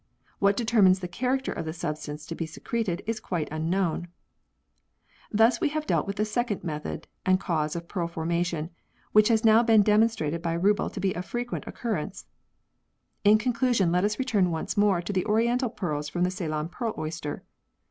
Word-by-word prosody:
What 200 0 +3
determines 220 -6 +4
the 180 - -4
character 255 +8 -1
of - - -4
the 160 - -4
sub 155 -2 -3
stance 150 0 -8
to 165 - -5
be 165 0 -4
secreted 190 +2 -3
is 225 +1 -2
quite 170 -4 -3
unknown. 170 +2 -1 1.2
Thus 225 - +4
we 315 - +2
have 305 +1 -3
dealt - - +1
with 200 +1 -4
a 215 - +3
second 215 -1 -2
method 150 -3 -5 0.2
and 185 0 +3
cause 160 -5 -1
of 170 0 -5
pearl 175 -3 -2
formation, 170 0 -2 0.4
which 215 0 +6
has 225 -1 +2
now 220 +1 +7
been 225 -3 +5
demon 215 +2 +5
strated 165 -7 -3
by 170 -1 -1
Rubbel 200 +4 +2
to - - -5
be 190 -1 0
of 180 - -4
frequent 240 +3 -4
occurrence. 200 -6 -4 1.0
In 210 +1 +7
conclusion 235 -5 +1
let 180 +1 +2
us 210 +1 0
return 215 -9 +2
once 160 -2 -3
more 205 -4 +3
to 200 - -4
the 185 +1 0
oriental 235 +4 +2
pearls 150 -9 -3
from 175 +1 -1
the 180 - +1
Ceylon 160 -4 -3
pearl 225 +5 -3
oyster. 155 -1 -4
190 Hz, 190 wpm, -27 LUFS, 170-225 Hz, 1.2 s, now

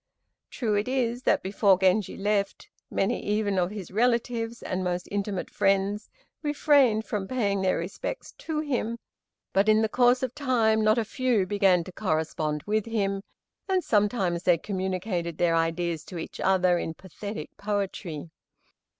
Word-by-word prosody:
True 225 -4 -1
it 205 +2 0
is 250 -2 0
that - - +2
before 195 0 +3
Genji 190 +2 +2
left, 200 0 -1 0.2
many 195 - 0
even 205 -2 0
of 175 0 +1
his 200 -4 -7
relatives 235 +1 0
and 185 0 -2
most 180 0 -2
intimate 200 -2 -2
friends 195 +2 +1 0.3
refrained 285 -7 +3
from 200 -3 -3
paying 200 -6 0
their 185 -1 +2
respects 195 - -5
to 310 -2 -2
him, 240 -6 -2 0.6
but 195 +2 +3
in 215 +1 +5
the - - +3
course 245 +3 +3
of 255 -2 -2
time 230 -6 +2
not 215 +2 +4
a 230 - +1
few 235 -3 +1
began 190 -3 +3
to 185 - -10
correspond 155 -4 -1
with 215 +1 -1
him, 200 -3 -1 0.5
and 375 -2 +2
sometimes 200 -5 +1
they 175 -2 +4
communicated 185 -2 -3
their 170 -1 +2
ideas 165 0 0
to 180 - -8
each 165 - -7
other 185 -2 +3
in 160 - -4
pathetic 190 -1 -8
poetry. 195 -6 -3
200 Hz, 155 wpm, -27 LUFS, 185-225 Hz, 0.6 s, in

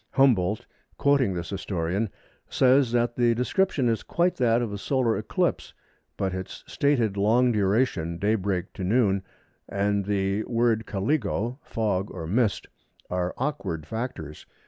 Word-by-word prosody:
Humboldt, 110 -8 +3 0.3
quoting 140 -9 +2
this 85 +2 -5
historian, 95 +1 -2 0.4
says 130 -1 +4
that 120 0 +1
the 120 -1 +3
description 135 - +1
is 115 -1 +1
quite 175 +1 +1
that 120 -2 +3
of 110 -3 -4
a 100 - -5
solar 125 -1 +1
eclipse, - - -1 0.4
but 95 -1 -1
its 95 0 -6
stated 120 -8 +1
long 120 +5 +3
duration 100 -5 +1
(daybreak 100 -2 -1
to 95 - -6
noon), 100 -1 +2 0.5
and 100 0 0
the 100 +1 0
word 115 -1 +1
caligo 115 +2 -1
(fog 105 -4 -1
or 85 -3 -6
mist) 105 +5 +1 0.5
are 90 0 -1
awkward 130 - -3
factors. 110 - -6
110 Hz, 135 wpm, -26 LUFS, 95-125 Hz, 0.5 s, says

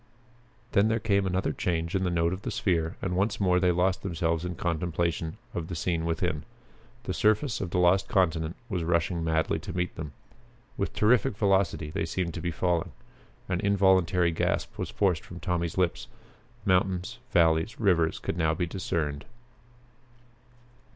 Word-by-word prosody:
Then 100 0 +4
there 115 +1 +1
came 100 -3 +1
another 95 +1 0
change 85 -1 -1
in 95 -1 +1
the 90 - +1
note 85 0 +1
of 95 - -5
the - - -4
sphere 85 -3 0
and 90 -2 -1
once 100 +3 0
more 90 -2 +3
they 90 -1 +3
lost 90 +2 +1
themselves 85 -2 -1
in 90 -1 -4
contemplation 85 -1 -1 0.2
of 80 -2 -3
the 85 - -5
scene 85 0 -1
within. 85 -2 -1 0.6
The - - -3
surface 110 +4 +2
of 95 - -3
the 90 - -2
lost 90 +2 +4
continent 80 -3 +1
was 90 -6 -2
rushing 85 0 0
madly 80 0 +1
to - - -6
meet 90 0 -1
them. 75 -3 -6 0.6
With - - -3
terrific 105 -2 +3
velocity 95 -6 +1
they 80 - -1
seemed 85 0 -2
to 85 - -5
be 85 - -1
falling. 85 0 -1 0.5
An 90 -2 -1
involuntary 95 -3 +3
gasp 80 - -1
was - - -2
forced 95 -5 +1
from 90 - -10
Tommy's 85 -2 -2
lips. 90 -2 0 0.6
Mountains, 90 -1 +1
valleys, 80 +4 +2
rivers 90 -7 +2
could - - -4
now 80 -1 +2
be 90 +1 0
discerned. 80 -5 -3
90 Hz, 165 wpm, -28 LUFS, 85-95 Hz, 0.6 s, Then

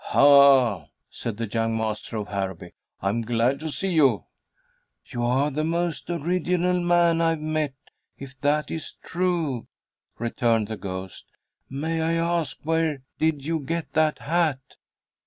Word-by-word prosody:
"Ha!" 140 -6 +5 0.2
said 115 -3 -5
the 115 - -2
young 115 +1 -1
master 110 0 -3
of 105 -1 -4
Harrowby. 95 -3 -4 0.3
"I'm 100 +4 0
glad 120 +4 +1
to 160 +1 -4
see 190 +5 -2
you." 155 -6 +3 0.8
"You 120 -3 -5
are 130 +5 +2
the 155 +3 -1
most 170 +1 -2
original 180 +2 0
man 175 -1 +3
I've 165 -1 +2
met, 155 -2 -2 0.4
if 135 0 -10
that 150 +1 +1
is 160 - -5
true," 165 -9 -1 0.5
returned 115 -2 0
the 110 - -4
ghost. 95 -1 -7 0.4
"May 160 +4 -2
I 165 +1 +1
ask 165 -5 0
where 160 -3 0 0.2
did 155 -3 0
you 165 +1 0
get 165 +3 -4
that 155 -1 +2
hat?" 160 -3 0
145 Hz, 140 wpm, -25 LUFS, 115-165 Hz, 0.8 s, Ha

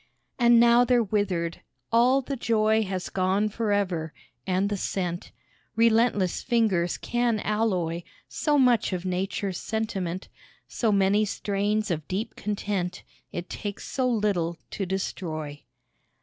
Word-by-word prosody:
And 240 -1 +6
now 235 +1 +6
they're 245 -1 +3
withered! 185 -5 -1 0.3
all 250 +4 +4
the 275 +2 -3
joy 220 -2 +2
Has 185 -2 -3
gone 195 +3 +1
for 220 0 -2
ever, 180 -6 -1 0.3
and 190 +1 +1
the 205 - -1
scent; 180 -2 -3 0.4
Relentless 225 -4 +3
fingers 210 -8 +1
can 240 -2 0
alloy 185 -6 0 0.3
So 300 -1 +1
much 245 -6 +3
of 180 0 -3
nature's 185 +1 -2
sentiment, 195 -5 -3 0.4
So 225 -3 0
many 200 +1 +3
strains 205 0 -1
of 155 -3 -3
deep 210 +5 -3
content, 200 -3 -3 0.3
It 175 +1 -5
takes 205 -1 -6
so 255 -2 0
little 200 -7 0
to 195 - -3
destroy. 155 -6 -4
205 Hz, 130 wpm, -26 LUFS, 185-225 Hz, 0.4 s, And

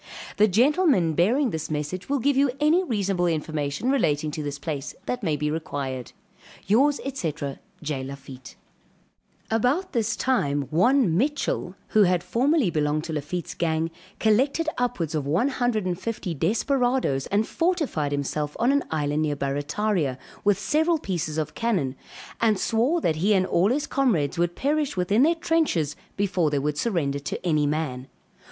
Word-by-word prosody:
The 215 - +5
gentlemen 240 - +3
bearing 230 - +2
this 160 -1 -4
message 155 - -4
will 285 - +2
give 275 +2 +1
you 275 +1 +4
any 315 +5 +4
reasonable 195 - 0
information 155 - -1
relating 150 - +1
to 155 - -4
this 145 -1 -4
place, 140 -1 -5
that 250 0 -2
may 160 -7 0
be 150 +1 -1
required. 140 -5 -4 0.5
Yours, 275 +8 +3
&c. 175 - -2 0.5
J. 145 -3 -3
LAFITTE. 135 -1 -10 1.0
About 250 - +1
this 225 -1 0
time 145 - +1
one 220 - +3
Mitchell, 260 - -1
who 215 - +4
had 180 -3 +3
formerly 265 - +2
belonged 150 0 0
to 165 -1 -5
Lafitte's 170 +4 -4
gang, 165 -1 -1 0.3
collected 265 +9 +2
upwards 215 -11 -1
of 150 -3 -2
one 175 - +2
hundred 245 -6 0
and 180 -1 -2
fifty 215 -6 -3
desperadoes 230 - +1
and 210 +2 +1
fortified 320 - 0
himself 145 +1 -2
on 240 +3 +3
an 280 0 +2
island 150 -1 0
near 150 -2 0
Barrataria, 145 +2 -1 0.3
with 205 -2 +3
several 315 +10 +2
pieces 175 - -3
of 155 -1 -2
cannon; 185 - -1 0.5
and 220 -3 +3
swore 245 - +1
that 155 - +1
he 200 +6 +3
and 185 -1 +3
all 185 +2 +2
his 285 +4 0
comrades 180 - +1
would 175 0 +1
perish 295 -3 0
within 200 +6 +2
their 325 +4 +4
trenches 315 - 0 0.2
before 190 -5 +1
they 145 - 0
would 150 +1 -1
surrender 155 -11 0
to 145 - -5
any 155 -4 +2
man. 145 -4 -2
180 Hz, 160 wpm, -25 LUFS, 150-245 Hz, 1.0 s, The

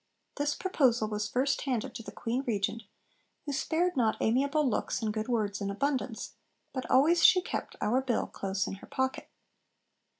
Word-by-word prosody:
This 290 0 0
proposal 255 - +2
was 210 -1 -2
first 270 +3 +1
handed 250 -6 -2
to - - -6
the - - -9
Queen 240 +4 -2
Regent, 215 0 0 0.6
who 290 - -3
'spared 335 +6 0
not 230 -4 +2
amiable 280 +6 +2
looks 245 - -1
and 215 -1 0
good 215 0 -3
words 215 -4 -1
in 200 - -1
abundance, 255 +2 -2 0.4
but 260 -2 -4
always 320 +6 +5
she 370 - +8
kept 360 - -4
our 235 +5 +2
Bill 250 -3 0
close 195 0 -2
in - - -4
her - - -12
pocket.' 260 0 -2
250 Hz, 170 wpm, -30 LUFS, 215-280 Hz, 0.6 s, she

